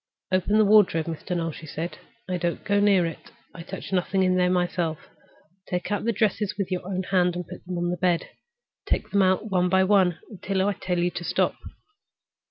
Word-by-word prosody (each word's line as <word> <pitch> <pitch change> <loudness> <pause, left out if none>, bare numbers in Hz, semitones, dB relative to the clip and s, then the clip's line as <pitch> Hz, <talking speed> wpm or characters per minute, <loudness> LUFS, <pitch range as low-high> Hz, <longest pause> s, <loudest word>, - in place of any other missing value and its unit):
"Open 185 +3 +2
the 215 - +5
wardrobe, 200 -6 +5
Mr. 170 +2 -4
Noel," 165 -1 -2
she 160 +1 -10
said. 165 +4 -5 0.3
"I 185 -1 -1
don't 175 0 -2
go 205 +1 +2
near 200 -3 +4
it. 165 - -7 0.2
I 170 - -9
touch 190 +3 -7
nothing 185 +1 +1
in 185 0 +2
it 180 0 +3
myself. 175 -3 0 0.7
Take 180 +2 -3
out 205 - -1
the 230 - +2
dresses 210 -1 0
with 200 -2 -3
your 180 - -2
own 190 -1 -2
hand 180 -2 +3
and 175 -1 -5
put - - -10
them 180 -1 -3
on 175 0 -1
the 180 - -2
bed. 175 -2 +1 0.6
Take - - -1
them 200 - +3
out 190 +3 +1
one 180 -1 +2
by 190 +1 +4
one 190 -3 +3
until 195 -1 -1
I 205 - +1
tell 180 -1 -3
you 175 +1 +1
to 175 - -6
stop." - - +1
185 Hz, 210 wpm, -25 LUFS, 175-195 Hz, 0.7 s, the